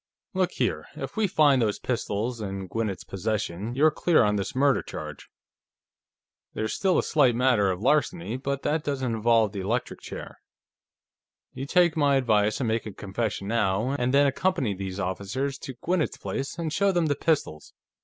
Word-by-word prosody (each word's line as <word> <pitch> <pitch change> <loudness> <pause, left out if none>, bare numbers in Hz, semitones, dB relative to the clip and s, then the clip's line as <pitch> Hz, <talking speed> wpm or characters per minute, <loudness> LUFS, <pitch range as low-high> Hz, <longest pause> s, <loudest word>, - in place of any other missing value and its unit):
"Look 185 -1 0
here; - - -1
if - - -6
we 220 -2 +2
find 145 -7 +4
those 105 -3 +1
pistols 115 -1 -2
in 95 -2 -4
Gwinnett's 105 -1 -3
possession, 105 +2 -3
you're 155 +3 +5
clear 165 -2 +3
on 105 -1 +2
this 100 +2 -3
murder 140 0 +3
charge. - - -8 1.3
There's 110 0 -2
still 190 -3 +2
a - - +2
slight 135 -7 +3
matter 120 -5 +3
of 90 0 -2
larceny, 150 -3 +1
but 140 +1 -3
that 150 +1 0
doesn't 130 -4 -1
involve 115 -1 +3
the 100 - -5
electric 110 +6 -2
chair. - - -8 1.1
You 135 - -5
take 175 0 +3
my 145 -3 +3
advice 110 -4 +2
and 130 - -1
make 110 0 -1
a 105 - -7
confession 100 0 -3
now, 110 +1 +1
and 125 -3 0
then 140 +1 +5
accompany 140 - +1
these 95 0 -5
officers 100 +10 -3
to 130 - -7
Gwinnett's 175 -3 0
place 135 +4 -4
and 160 -2 -3
show 200 +2 +3
them 175 -3 +1
the 145 - +2
pistols. 140 - -1
125 Hz, 175 wpm, -26 LUFS, 105-145 Hz, 1.3 s, you're